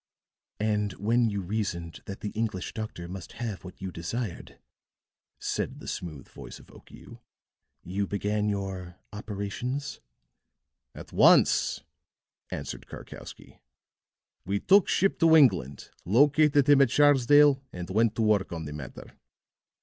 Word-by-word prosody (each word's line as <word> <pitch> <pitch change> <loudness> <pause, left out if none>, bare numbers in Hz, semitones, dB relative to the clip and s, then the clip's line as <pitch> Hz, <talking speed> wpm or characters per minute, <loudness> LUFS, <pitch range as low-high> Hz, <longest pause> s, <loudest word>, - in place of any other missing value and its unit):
"And 105 -2 0
when 115 +4 +1
you 100 -1 -3
reasoned 90 -4 -4
that 100 - -7
the 105 - -4
English 110 -4 -3
doctor 110 -6 -6
must 90 0 -9
have 110 -5 -5
what 90 - -11
you 95 -1 -5
desired," 90 +4 -5 0.8
said - - -3
the - - -11
smooth 75 -6 -6
voice - - -11
of - - -18
Okiu, - - -15 0.6
"you 100 +2 -3
began 105 +1 -1
your 95 -3 -5 0.2
operations?" 110 +7 -5 1.0
"At - - -11
once," - - +4 0.7
answered - - -6
Karkowsky. - - -11 0.8
"We 100 +2 -1
took 195 - +4
ship 195 - +1
to 165 -1 +6
England, 70 - +3
located 145 - +4
him 145 -1 +6
at 135 - +4
Sharsdale, 145 0 +5
and 90 -1 -7
went 110 +2 +2
to 115 - 0
work 105 -3 +2
on 80 -2 -5
the 75 - -6
matter. 70 -4 -9
105 Hz, 130 wpm, -27 LUFS, 95-125 Hz, 1.0 s, to